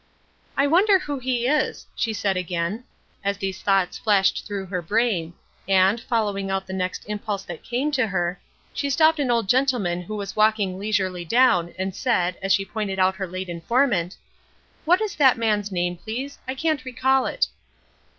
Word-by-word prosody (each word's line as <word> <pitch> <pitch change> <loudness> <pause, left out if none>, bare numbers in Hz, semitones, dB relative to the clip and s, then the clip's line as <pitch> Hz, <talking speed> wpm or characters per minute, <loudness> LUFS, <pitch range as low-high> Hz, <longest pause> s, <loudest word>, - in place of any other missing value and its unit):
"I 275 - +4
wonder 380 +7 +5
who 290 -6 -4
he 250 -2 -1
is?" 300 +4 0
she 225 - -1
said 200 -2 0
again, 180 +5 -2 0.4
as 200 0 0
these 195 -1 -4
thoughts 195 -2 +1
flashed 195 -3 +2
through 200 -2 -4
her 185 -1 -3
brain, 180 -3 0 0.3
and, 195 +3 +4
following 205 -5 -1
out 195 0 -1
the 190 - -7
next 185 -1 -3
impulse 210 -1 -3
that 175 -3 -8
came 265 +5 -1
to 260 -5 +1
her, 180 -2 -2 0.3
she 285 - -2
stopped 315 +3 +4
an 275 -3 0
old 230 -4 +1
gentleman 240 -8 +1
who 215 +4 -6
was 200 -1 -5
walking 215 -3 +2
leisurely 190 -4 -1
down, 180 -4 +3
and 190 0 -2
said, 180 -8 +1
as 195 0 -1
she 195 0 +3
pointed 205 -2 -3
out 190 0 +2
her 190 -1 -3
late 185 +1 -5
informant: 180 +1 0 0.7
"What 355 +5 +4
is 425 -2 -1
that 265 -5 +5
man's 210 -3 0
name, 175 -1 -1
please? 260 +9 -6
I 260 - -3
can't 310 -1 0
recall 260 +1 +1
it." - - +1
205 Hz, 180 wpm, -23 LUFS, 185-255 Hz, 0.7 s, wonder